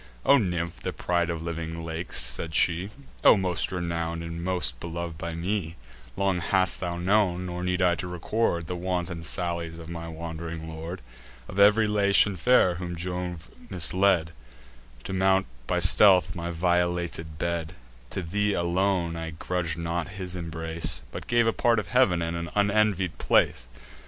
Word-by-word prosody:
"O 140 - +6
nymph, 85 -5 -2
the - - -3
pride 85 -1 0
of 80 -1 -3
living 85 0 -5
lakes," 80 +1 -3
said 80 -2 -1
she, 90 +3 +2 0.3
"O - - +8
most 90 -2 -1
renown'd, 85 -2 -3
and 85 0 -6
most 90 0 0
belov'd 85 -1 -5
by 85 0 -4
me, 85 -1 -2 0.4
Long 95 -2 +1
hast 95 +2 +2
thou 85 -1 -3
known, 90 -1 +1
nor 90 0 -5
need 90 0 0
I 90 -1 +4
to 90 +1 -4
record, 90 0 -1
The 90 - -4
wanton 90 -1 -3
sallies 85 0 -2
of 85 -1 -10
my 85 -1 -6
wand'ring 80 0 -6
lord. 80 -2 -7 0.4
Of 95 - -5
ev'ry 105 +2 +6
Latian 100 -1 +3
fair 90 0 +4
whom 90 -1 -4
Jove 90 -1 -4 0.2
misled 90 -1 +2 0.7
To - - -5
mount 95 0 +3 0.2
by - - 0
stealth 95 -4 +6
my 85 0 -4
violated 85 -2 -1
bed, 85 0 -3 0.3
To 95 - -4
thee 105 +4 0
alone 85 0 0
I 80 0 -4
grudg'd 85 0 -3
not 85 0 -2
his 90 -1 -5
embrace, 80 -4 -2
But - - -7
gave 120 0 +3
a 115 - +2
part 120 -1 +2
of 105 - -2
heav'n, 95 -10 +3
and 85 +1 -3
an 85 0 -4
unenvied 100 -3 +1
place. 60 - +2
85 Hz, 160 wpm, -26 LUFS, 85-95 Hz, 0.7 s, O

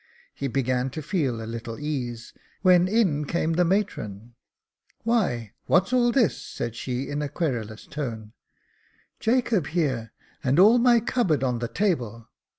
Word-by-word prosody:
He 140 - -3
began 130 0 0
to - - -2
feel 135 - -1
a - - -5
little 115 0 -6
ease, 125 -6 -4 0.3
when 180 -1 +6
in 185 -9 +2
came 165 +2 0
the 180 +2 +3
matron. 120 - -2 0.7
Why, 180 - 0
what's 190 +7 +3
all 240 -1 +4
this?" 235 - +2
said 115 -1 -5
she 125 +2 -3
in 145 +1 -3
a 145 - -2
querulous 120 -10 -3
tone. 115 -7 -5 0.4
" - - -38
Jacob 230 - +2
here, 140 -8 -1 0.3
and 130 +1 +2
all 215 +7 +7
my 240 -1 +5
cupboard 190 - +1
on 125 -2 0
the 120 - -2
table. 120 - -1
145 Hz, 155 wpm, -25 LUFS, 120-185 Hz, 0.7 s, all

